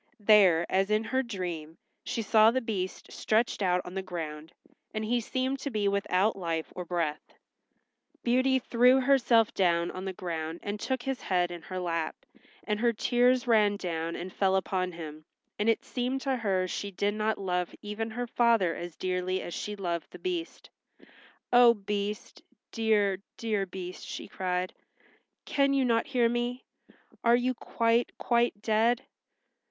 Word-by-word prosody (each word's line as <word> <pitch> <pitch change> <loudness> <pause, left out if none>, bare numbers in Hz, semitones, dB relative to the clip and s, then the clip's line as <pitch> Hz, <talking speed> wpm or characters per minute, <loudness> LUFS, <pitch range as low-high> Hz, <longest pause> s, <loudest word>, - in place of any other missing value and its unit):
There, 195 -6 +6
as 195 +1 +1
in 215 +1 +2
her 260 +4 0
dream, 175 -9 -5 0.3
she 230 - -3
saw 215 +1 +6
the 255 +3 +1
Beast 200 -6 -4
stretched 220 0 0
out 180 -2 +2
on 180 - -8
the 190 - -2
ground, 160 -4 -6 0.4
and 215 0 -1
he 240 +2 +1
seemed 260 +4 -2
to 280 - -3
be 210 -5 0
without 200 +1 +1
life 165 -4 -3
or 180 - -4
breath. 165 -4 -3 0.9
Beauty 260 +2 +3
threw 250 +1 +4
herself 250 -4 +4
down 170 -2 +2
on 185 - -6
the 190 - -3
ground 165 -2 -4
and 205 +1 -4
took 260 +2 -2
his 270 -1 -3
head 180 -2 +1
in 175 -1 -7
her 185 +3 -7
lap, 165 -3 -2 0.5
and 210 -1 -1
her 235 +1 +3
tears 245 +3 +2
ran 210 -4 +4
down 165 -3 -3
and 180 +1 -6
fell 190 -1 +2
upon 185 -1 0
him, 155 -2 -8 0.4
and 210 +2 +2
it 225 - +2
seemed 255 +2 -2
to 270 -1 0
her 190 -5 0
she 200 +2 -4
did 200 +2 -1
not 215 +1 0
love 180 -2 -1
even 210 +2 -4
her 245 +2 -3
father 230 -7 +3
as 175 -1 -7
dearly 185 0 -1
as 175 - -6
she 210 - -4
loved 175 -4 -3
the - - -11
Beast. 355 -2 -5 0.8
"Oh, 240 -1 +8
Beast—dear, 205 0 -2 0.2
dear 210 -4 -1
Beast," 180 0 -7
she - - -7
cried, 180 -1 -2 0.7
"can 275 -1 +2
you 270 -1 +3
not 230 0 +2
hear 250 -4 +2
me? 240 +2 -2 0.6
Are 235 0 +6
you 250 +1 +1
quite, 230 0 +1
quite 235 -3 +1
dead?" 230 +3 +2
210 Hz, 165 wpm, -29 LUFS, 180-240 Hz, 0.9 s, Oh